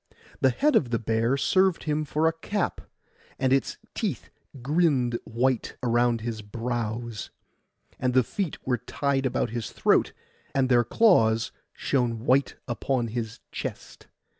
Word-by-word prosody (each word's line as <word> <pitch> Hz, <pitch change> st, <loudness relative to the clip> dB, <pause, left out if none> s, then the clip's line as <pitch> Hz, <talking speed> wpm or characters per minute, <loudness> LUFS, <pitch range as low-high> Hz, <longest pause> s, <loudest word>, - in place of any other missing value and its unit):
The 135 Hz, -, +4 dB
head 290 Hz, -, +2 dB
of 125 Hz, -, +3 dB
the 115 Hz, -, +1 dB
bear 115 Hz, +3 st, +1 dB
served 185 Hz, +4 st, +2 dB
him 155 Hz, 0 st, -1 dB
for 155 Hz, +2 st, +1 dB
a 165 Hz, -, +2 dB
cap, 190 Hz, +4 st, -2 dB, 0.6 s
and 130 Hz, 0 st, +2 dB
its 135 Hz, -, +1 dB, 0.2 s
teeth -, -, -3 dB, 0.3 s
grinned 135 Hz, -5 st, +2 dB
white 120 Hz, +2 st, 0 dB
around 120 Hz, -1 st, +2 dB
his 115 Hz, -1 st, -4 dB
brows; 115 Hz, 0 st, -4 dB, 0.7 s
and 125 Hz, 0 st, 0 dB
the 130 Hz, -, +6 dB
feet 185 Hz, -, -3 dB
were 125 Hz, -2 st, 0 dB
tied 135 Hz, +2 st, 0 dB
about 125 Hz, -, -1 dB
his 120 Hz, -2 st, -3 dB
throat, -, -, +2 dB, 0.4 s
and 130 Hz, -1 st, +2 dB
their 120 Hz, -1 st, +5 dB
claws 115 Hz, -, +3 dB, 0.2 s
shone 120 Hz, -4 st, -1 dB
white 135 Hz, +2 st, +3 dB
upon 120 Hz, 0 st, -1 dB
his 115 Hz, -1 st, -4 dB
chest. -, -, -7 dB
125 Hz, 140 wpm, -26 LUFS, 115-140 Hz, 0.7 s, the